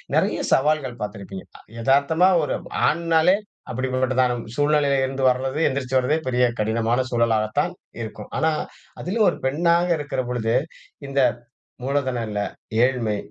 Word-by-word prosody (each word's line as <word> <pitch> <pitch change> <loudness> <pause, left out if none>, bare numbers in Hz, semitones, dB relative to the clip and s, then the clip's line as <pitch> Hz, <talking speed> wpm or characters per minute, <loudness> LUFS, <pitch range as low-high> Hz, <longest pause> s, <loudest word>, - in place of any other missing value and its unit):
நறைய - - +1
சவால்கள் 135 -4 +1
பார்த்திருப்பீங்க. 100 -2 -6 0.4
எதார்த்தமா 140 +8 +3 0.2
ஒரு - - -1 0.3
ஆண்னாலே, 170 +2 +3 0.4
அப்டிப்பட்டதான 130 0 +1 0.2
சூழ்நிலையிலிருந்து 140 -2 +1
வர்றது, 130 +3 -1
எந்திரிச்சு 130 -1 -1
வர்றதே 130 +5 +1
பெரிய 125 0 +3
கடினமான 115 +3 +1
சூழலாகத்தான் 110 -2 +1 0.3
இருக்கும். 110 -2 -7
ஆனா, 160 - +2 0.5
அதுலயும் 210 +4 +2
ஒரு - - -4
பெண்ணாக 170 +5 +2
இருக்கிற 145 -3 -2
பொழுது, 115 -2 -1 0.5
இந்த 140 0 -1 0.6
மூலதனம் 130 -4 -1
இல்ல, 105 -1 -2 0.4
ஏழ்மை, 120 -5 +1
130 Hz, 115 wpm, -23 LUFS, 115-145 Hz, 0.6 s, எதார்த்தமா